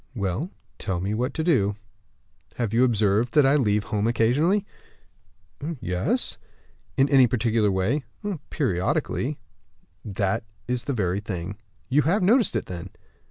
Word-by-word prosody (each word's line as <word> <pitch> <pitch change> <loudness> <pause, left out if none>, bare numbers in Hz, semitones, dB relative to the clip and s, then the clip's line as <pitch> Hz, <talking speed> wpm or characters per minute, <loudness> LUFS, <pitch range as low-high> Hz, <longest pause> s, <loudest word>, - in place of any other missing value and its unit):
"Well, 100 - -2 0.3
tell 95 -4 -2
me 95 +4 -2
what 125 +5 -2
you 160 - 0
do." 110 - +2 0.8
"Have 115 -3 -2
you 120 +2 +4
observed 110 0 +2
that 150 -2 +6
I 135 +2 +5
leave 105 -7 +2
home 105 +1 -1
occasionally?" 145 - +2 1.1
"Yes." 120 - -1 0.6
"In 135 +1 +5
any 135 -3 +6
particular 115 -2 +2
way?" 100 +10 0 0.5
"Periodically." 95 - -1 0.7
"That's 100 +2 -1 0.4
the 140 - -1
very 95 -4 0
thing. 100 -1 -5 0.3
You 140 +3 +3
have 185 +7 +2
noticed 225 - +4
it, 110 - -1
then?" 90 +1 -7
115 Hz, 130 wpm, -25 LUFS, 100-140 Hz, 1.1 s, that